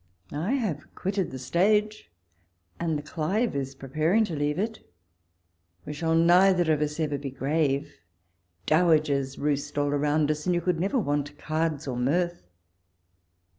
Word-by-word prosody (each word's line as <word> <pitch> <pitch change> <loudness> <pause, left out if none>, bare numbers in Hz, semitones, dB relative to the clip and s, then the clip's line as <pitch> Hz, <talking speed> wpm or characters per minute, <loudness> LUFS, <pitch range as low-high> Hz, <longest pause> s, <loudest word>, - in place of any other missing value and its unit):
I 165 - -1
have 210 - -3
quitted 195 -1 -2
the 130 - -7
stage, 210 +11 +1 0.7
and 165 -2 0
the 145 - -6
Clive 180 +8 -1
is 135 -1 -3
pre 135 - -10
paring 165 - +2
to 170 - -5
leave 145 +1 -1
it. 220 +3 -2 1.1
We 150 - -5
shall 160 +2 0
neither 175 0 +5
of 150 - -1
us 150 +1 -2
ever 150 -3 -1
be 140 0 -5
grave: 140 +2 -1 0.7
dowagers 155 -5 +2
roost 145 0 -2
all 145 0 +1
around 145 +1 +1
us, 150 +3 -4
and 180 - +2
you 175 - 0
could 180 -2 0
never 195 +9 0
want 145 - -1
cards 155 -2 -2
or 125 -2 -3
mirth. 175 +8 0
155 Hz, 155 wpm, -27 LUFS, 145-180 Hz, 1.1 s, neither